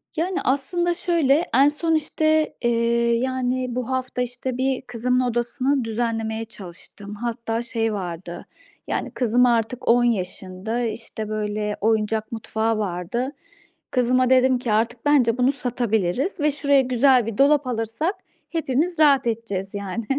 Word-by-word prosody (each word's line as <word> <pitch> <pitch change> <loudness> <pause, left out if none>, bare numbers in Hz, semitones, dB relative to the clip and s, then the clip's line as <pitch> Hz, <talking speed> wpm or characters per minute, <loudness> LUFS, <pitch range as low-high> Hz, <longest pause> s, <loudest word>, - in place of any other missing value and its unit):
Yani, 360 +3 -1
aslında 345 +6 0
şöyle, 335 -3 +2
en 275 +3 +6
son, 320 +2 +1
işte, 310 0 +1
eee, 235 0 +2
yani, 255 -1 -1
bu 250 -1 -3
hafta, 255 -1 -2
işte, 250 +1 -4
bir 265 0 0
kızımın 250 0 -1
odasını 250 +3 0
düzenlemeye 225 -1 -2
çalıştım. 200 0 -11
Hatta 230 0 -3
şey 225 -2 -2
vardı 175 -3 -6 0.4
yani, - - -2
kızım 245 0 +2
artık 235 0 0
10 240 +1 +5
yaşında, 195 0 -2
işte, 220 -1 -5
böyle, 210 -1 -2
oyuncak 220 0 0
mutfağı 225 0 -1
vardı. 205 +6 -2 0.6
Kızıma 255 0 +2
dedim 260 0 +4
ki: 245 -3 -2
"Artık 230 +3 0
bence 255 -6 +3
bunu 250 +1 +3
satabiliriz 245 - -1
ve 300 0 +2
şuraya 280 -1 +3
güzel 255 -1 +3
bir 225 -2 -5
dolap 285 0 +4
alırsak 235 - -2 0.3
hepimiz 320 +2 -1
rahat 280 -5 +5
edeceğiz, 205 -4 -3
yani. 200 +2 -4
240 Hz, 135 wpm, -23 LUFS, 220-265 Hz, 0.6 s, en